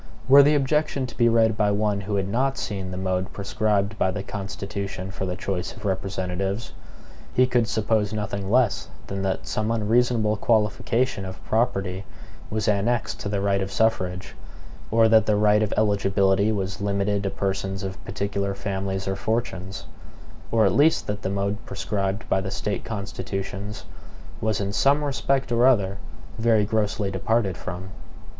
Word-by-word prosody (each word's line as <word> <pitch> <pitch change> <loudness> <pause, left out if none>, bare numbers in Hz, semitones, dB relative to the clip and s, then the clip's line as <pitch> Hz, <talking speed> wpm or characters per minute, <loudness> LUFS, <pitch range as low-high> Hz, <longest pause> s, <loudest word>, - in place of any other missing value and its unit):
Were 140 +2 +9
the 145 +2 +5
objection 145 -1 +1
to 125 - -9
be 120 -1 +4
read 115 -1 +3
by 105 -1 +2
one 105 0 +1
who 100 +1 -3
had 95 -1 0
not 130 +6 0
seen 95 -3 -4
the 90 - -5
mode 95 0 -1
prescribed 105 +1 0
by 95 - +3
the 95 +1 -3
Constitution 100 -1 -5
for 95 0 -4
the 90 - -2
choice 95 -1 -3
of 110 - -10
representatives, 95 0 -2 0.6
he 130 - +6
could 120 -2 +2
suppose 110 -2 +1
nothing 100 -2 -3
less 120 -2 +2 0.2
than 95 0 -4
that 95 -1 -2
some 110 +1 -1
unreasonable 115 -1 +2
qualification 115 +1 +1
of 95 0 -8
property 100 -5 0 0.5
was 110 -1 -2
annexed 110 +3 +1
to 100 - -4
the 100 -1 -1
right 100 -1 +1
of 95 0 -3
suffrage; 95 -4 0 0.6
or 115 0 +5
that 110 -1 +5
the 105 - +3
right 105 0 +4
of 110 - 0
eligibility 100 -1 +2
was 100 -2 -3
limited 100 0 0
to 100 - -1
persons 95 0 -2
of 95 -1 -6
particular 100 0 -2
families 95 -1 -3
or 95 - 0
fortunes; 95 -3 -3 0.7
or 110 -2 +4
at 95 - +3
least 150 +7 +4
that 105 0 -3
the 95 - -2
mode 100 +1 -2
prescribed 100 0 -2
by 95 - +2
the 95 - -4
State 100 +1 -3
constitutions 100 0 -5 0.6
was 110 -2 0
in 100 0 -2
some 140 +6 +3
respect 135 -2 0
or 120 +2 +5
other, 100 -6 +2 0.4
very 110 -2 +3
grossly 105 -2 0
departed 100 0 0
from. 90 +1 -6
100 Hz, 165 wpm, -24 LUFS, 95-110 Hz, 0.7 s, Were